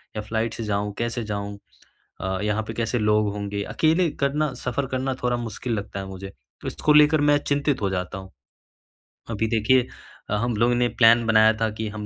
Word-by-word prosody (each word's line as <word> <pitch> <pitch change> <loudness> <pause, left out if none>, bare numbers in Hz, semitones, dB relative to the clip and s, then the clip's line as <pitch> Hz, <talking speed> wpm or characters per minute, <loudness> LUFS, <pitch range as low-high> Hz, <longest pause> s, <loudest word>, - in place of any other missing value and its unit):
या 105 - -2
फ़्लाइट 110 +1 -2
से 115 - -5
जाऊँ 105 -1 -2
कैसे 120 0 -2
जाऊँ? 100 -1 -4 0.6
अ, 95 0 -2
यहाँ 105 +1 0
पे 115 - -5
कैसे 115 +1 -1
लोग 105 -1 +2
होंगे? 100 0 -4
अकेले 165 - +2
करना 150 +2 +1
सफ़र 125 +2 -3
करना 130 +1 -1
थोड़ा 125 0 +1
मुश्किल 120 +1 -4
लगता 100 -2 -4
है 95 - -5
मुझे। 95 0 -8 0.3
तो - - -7
इसको 150 - +1
लेकर 150 0 +6
मैं 145 0 +4
चिंतित 140 -3 0
हो 100 - +1
जाता 90 0 -3
हूँ। 95 0 -10 1.0
अभी 110 0 -1
देखिए 120 +3 +2 0.4
अ, 105 - 0
हम 115 +2 -1
लोगों 120 +3 +3
ने 120 0 +2
प्लान 115 +1 +6
बनाया 110 0 +5
था 110 - +2
कि 110 - -2
हम 105 -1 -5
110 Hz, 200 wpm, -24 LUFS, 105-125 Hz, 1.0 s, लेकर